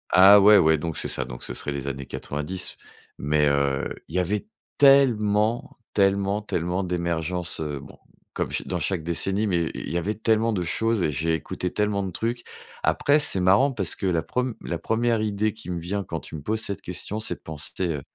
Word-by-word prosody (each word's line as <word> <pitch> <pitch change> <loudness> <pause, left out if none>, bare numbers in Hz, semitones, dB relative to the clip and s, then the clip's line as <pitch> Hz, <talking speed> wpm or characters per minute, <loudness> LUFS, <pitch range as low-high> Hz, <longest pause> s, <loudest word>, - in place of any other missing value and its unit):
Ah 100 +2 +9
ouais, 105 +1 +8
ouais, 80 -2 +4
donc 80 +1 -4
c'est - - -3
ça. 65 - -1
Donc - - -9
ce - - -5
serait 75 - -4
les 70 -1 -4
années 70 0 -4
90. 75 +8 -5 0.4
Mais, 75 +1 +2
heu, 70 -1 +1 0.2
il 80 - -8
y - - +3
avait 100 +3 -1 0.3
tellement, 120 -3 +4 0.2
tellement, 100 +1 +2
tellement 90 -2 -2
d'émergences, 85 -1 -2
heu- 75 -2 -3
bon, - - -13 0.4
comme - - -2
cha - - -2
dans 90 - -2
chaque 85 +2 -1
décennie- 95 +5 0
mais 85 -4 +1
i - - -5
il - - -5
y 85 - 0
avait 100 +5 -1
tellement 110 +1 +2
de 90 -4 -1
choses 110 +5 0
et 75 - +1
j'ai 80 +4 0
écouté 80 +3 -3
tellement 105 -1 0
de 95 - -4
trucs. 120 +5 -3 0.4
Après, 145 +2 +3
c'est 140 -9 +2
marrant 100 +10 +4
parce 100 -9 -1
que - - -5
la 85 -3 +2
preme 125 +2 -2
la 85 - -3
1e 115 0 +1
idée 105 0 0
qui 110 -4 -11
me 90 -1 -2
vient 100 +4 -3
quand - - -5
tu - - -10
me 75 - -6
poses 110 +9 -1
cette 100 -3 -4
question, 90 +4 -4
c'est - - -1
de - - -23
penser, 80 +4 -3
heu- 75 -4 -2
95 Hz, 215 wpm, -25 LUFS, 80-105 Hz, 0.4 s, Ah